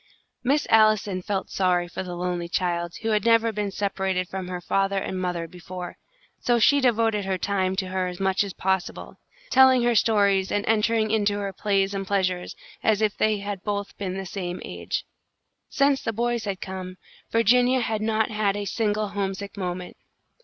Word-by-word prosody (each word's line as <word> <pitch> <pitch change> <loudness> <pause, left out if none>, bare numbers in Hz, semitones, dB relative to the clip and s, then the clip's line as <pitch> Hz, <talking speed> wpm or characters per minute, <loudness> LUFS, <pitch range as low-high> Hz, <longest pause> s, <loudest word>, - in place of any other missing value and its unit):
Miss 280 +4 +2
Allison 215 -3 +4
felt 195 +1 -3
sorry 180 -2 +1
for 175 - -5
the 180 -2 -6
lonely 175 -1 -3
child, 175 -1 -1
who 225 - 0
had 210 -2 +2
never 230 0 +4
been 210 -1 -2
separated 190 -2 -1
from 190 0 -5
her 180 -1 -4
father 195 +2 0
and 190 -1 -3
mother 175 -2 -2
before, 180 +1 -8 0.4
so 240 -1 +2
she 285 +5 +4
devoted 225 -4 +2
her 190 -1 -1
time 190 -1 0
to 190 -1 -2
her 185 0 -1
as 180 -1 -6
much 190 +1 +2
as 200 - -5
possible, 190 -1 -2 0.3
telling 260 -2 +6
her 240 0 +3
stories 200 -4 +3
and 205 0 0
entering 220 0 +2
into 205 -2 +1
her 200 -1 -3
plays 195 0 0
and 195 -1 -4
pleasures 185 -2 -1 0.3
as 215 -2 +2
if 210 -1 +1
they 215 -2 +1
had 200 -2 -4
both 205 -1 -3
been 190 -2 -3
the 195 - -4
same 180 -1 -5
age. - - -4 0.6
Since 280 -1 +2
the 225 - -2
boys 235 +1 -1
had 195 -2 -4
come, 185 -1 -6 0.3
Virginia 245 +3 +4
had 220 -2 -1
not 220 0 +1
had 210 -2 0
a 205 - -3
single 210 0 -1
homesick 200 0 -4
moment. 180 -2 -5
200 Hz, 180 wpm, -25 LUFS, 185-220 Hz, 0.6 s, telling